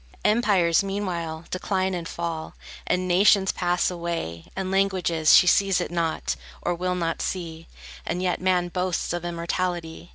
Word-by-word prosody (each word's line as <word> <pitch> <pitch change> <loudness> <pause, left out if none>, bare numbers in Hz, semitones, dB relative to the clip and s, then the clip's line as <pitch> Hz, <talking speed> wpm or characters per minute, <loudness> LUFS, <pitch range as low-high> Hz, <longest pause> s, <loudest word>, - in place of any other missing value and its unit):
Empires, 200 -7 +3
meanwhile, 175 -5 -3
decline 190 0 -1
and 170 -2 -4
fall, 165 -2 -5 0.3
And 180 +1 0
nations 190 +2 +4
pass 175 0 0
away, 170 - -4
and 190 -1 -3
languages: 185 -5 +3
She - - +7
sees 195 0 +3
it - - -3
not, 160 - -1 0.2
or - - -1
will 180 +1 -2
not 165 -2 -2
see; 165 -3 -4 0.4
And 175 - -3
yet 180 -1 0
man 180 -1 +1
boasts 180 -1 -1
of 175 -1 -3
immortality! 175 0 -3
175 Hz, 150 wpm, -25 LUFS, 170-185 Hz, 0.4 s, She